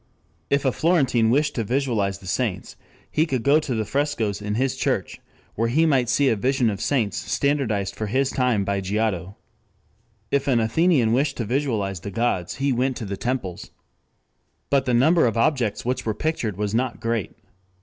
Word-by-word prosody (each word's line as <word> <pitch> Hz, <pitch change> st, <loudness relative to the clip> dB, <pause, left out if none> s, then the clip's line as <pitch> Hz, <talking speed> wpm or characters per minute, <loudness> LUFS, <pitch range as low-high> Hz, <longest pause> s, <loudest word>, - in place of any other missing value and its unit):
If 140 Hz, 0 st, +1 dB
a 130 Hz, -, +3 dB
Florentine 130 Hz, -4 st, +2 dB
wished 145 Hz, +5 st, +2 dB
to 115 Hz, -, -1 dB
visualize 115 Hz, -5 st, 0 dB
the 95 Hz, -, -16 dB
saints, 90 Hz, -, -2 dB, 0.4 s
he 155 Hz, +2 st, +2 dB
could 130 Hz, -6 st, -2 dB
go 145 Hz, +2 st, +5 dB
to 145 Hz, -6 st, -3 dB
the 110 Hz, -1 st, -1 dB
frescoes 125 Hz, -7 st, -1 dB
in 105 Hz, 0 st, -3 dB
his 130 Hz, +2 st, 0 dB
church, -, -, -2 dB, 0.3 s
where 115 Hz, +2 st, 0 dB
he 155 Hz, +8 st, +3 dB
might 130 Hz, -7 st, +2 dB
see 140 Hz, +2 st, +3 dB
a 115 Hz, -, +3 dB
vision 125 Hz, +1 st, +1 dB
of 100 Hz, -, -6 dB
saints 120 Hz, -8 st, 0 dB
standardized 115 Hz, -9 st, -1 dB
for 110 Hz, +1 st, -3 dB
his 130 Hz, +5 st, +1 dB
time 125 Hz, -6 st, +1 dB
by 100 Hz, 0 st, -1 dB
Giotto. 100 Hz, -1 st, -2 dB, 1.0 s
If 140 Hz, 0 st, +1 dB
an 125 Hz, -4 st, +3 dB
Athenian 115 Hz, +1 st, +2 dB
wished 140 Hz, +2 st, +1 dB
to 115 Hz, -, -2 dB
visualize 110 Hz, -7 st, -1 dB
the 100 Hz, -, -6 dB
gods 100 Hz, -4 st, -1 dB
he 140 Hz, 0 st, 0 dB
went 125 Hz, +1 st, 0 dB
to 115 Hz, -, -5 dB
the 100 Hz, 0 st, -4 dB
temples. 105 Hz, -6 st, -4 dB, 1.0 s
But 140 Hz, -2 st, +3 dB
the 125 Hz, -1 st, +1 dB
number 155 Hz, +4 st, +4 dB
of 115 Hz, -, -1 dB
objects 115 Hz, -3 st, +1 dB
which 125 Hz, +1 st, -1 dB
were 110 Hz, -2 st, -2 dB
pictured 120 Hz, -, -2 dB
was 105 Hz, 0 st, -2 dB
not 125 Hz, +2 st, -1 dB
great. 115 Hz, -3 st, -2 dB
120 Hz, 185 wpm, -23 LUFS, 105-140 Hz, 1.0 s, go